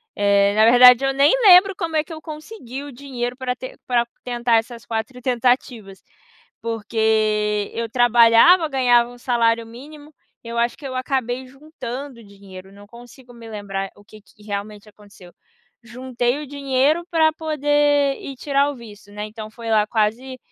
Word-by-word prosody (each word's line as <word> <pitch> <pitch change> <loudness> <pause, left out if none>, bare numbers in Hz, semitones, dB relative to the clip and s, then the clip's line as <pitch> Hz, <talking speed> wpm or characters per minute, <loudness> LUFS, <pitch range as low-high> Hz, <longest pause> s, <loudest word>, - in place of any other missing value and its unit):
eh, 200 0 +2
na 215 +1 +5
verdade 250 +2 +7
eu 270 - 0
nem 280 +2 +4
lembro 385 0 +7
como 330 -5 -4
é 310 - +2
que 325 - -16
eu 315 - -8
consegui 305 - -9
o 290 - -9
dinheiro 250 -2 -6
pra 255 -1 -3
ten 255 +1 -9
pra 240 -2 +1 0.2
tentar 240 -1 0
essas 230 +1 -5
4 230 +3 -5
tentativas. 245 -5 -1 0.6
Porque 215 -2 -1
eu 230 0 -3
trabalhava, 240 +8 +5
ganhava 245 -3 +2
1 245 - -13
salário 230 -2 0
mínimo, 290 +6 -13 0.3
eu 235 0 -5
acho 235 +1 0
que 280 - -10
eu 260 - -6
acabei 255 -1 -3
juntando 270 -2 -9
dinheiro, 195 -2 -14
não 205 +1 -16
consigo 245 +2 -16
me 230 -1 -13
lembrar 195 -2 -5
o 205 - -19
que 215 +1 -16
que 210 0 -24
realmente 205 0 -7
aconteceu. 205 -4 -17 0.5
Juntei 245 +1 -3
o 295 - -8
dinheiro 280 +4 0
para 320 -2 +3
poder 290 -2 +1
ir 275 -2 -8
tirar 280 +1 0
o 285 - -8
visto, 210 -4 -14
né, 210 +1 -6
então 215 0 -9
foi 230 0 -8
lá 215 -1 +3
quase 235 +5 -2
240 Hz, 165 wpm, -20 LUFS, 220-275 Hz, 0.6 s, verdade